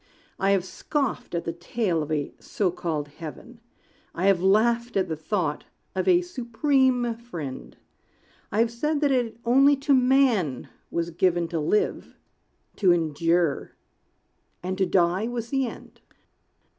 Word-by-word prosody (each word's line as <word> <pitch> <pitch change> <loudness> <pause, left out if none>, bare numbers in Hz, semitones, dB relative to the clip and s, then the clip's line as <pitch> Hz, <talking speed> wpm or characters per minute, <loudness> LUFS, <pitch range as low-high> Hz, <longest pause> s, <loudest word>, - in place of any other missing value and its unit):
I 195 - +2
have 195 -2 +2
scoffed 275 - -3
at 170 - -2
the 165 - -2
tale 175 0 -1
of 150 +1 -5
a 150 -2 -2
so 190 -4 -1
called 160 -4 -3
heaven; 170 +11 -10 0.6
I 175 - -1
have 195 -3 +4
laughed 230 +4 +2
at 190 - +1
the 160 - -1
thought 155 - -2 0.3
of - - -2
a 360 -1 +5
Supreme 255 -4 +1
Friend; 170 - -8 0.7
I 205 - -2
have 230 0 +1
said 300 +6 -1
that 290 -2 +3
it 240 -4 0
only 275 +4 +5
to 280 +1 +1
man 250 - +2 0.2
was 170 0 -2
given 175 0 +1
To 165 -1 -2
live, 185 +8 -1 0.6
to 190 -4 +4
endure; 165 -1 +1 0.9
and 185 +1 -2
to 190 - +2
die 180 +4 +2
was 235 -1 -4
the 270 -2 0
end. - - -11
200 Hz, 145 wpm, -25 LUFS, 170-245 Hz, 0.9 s, a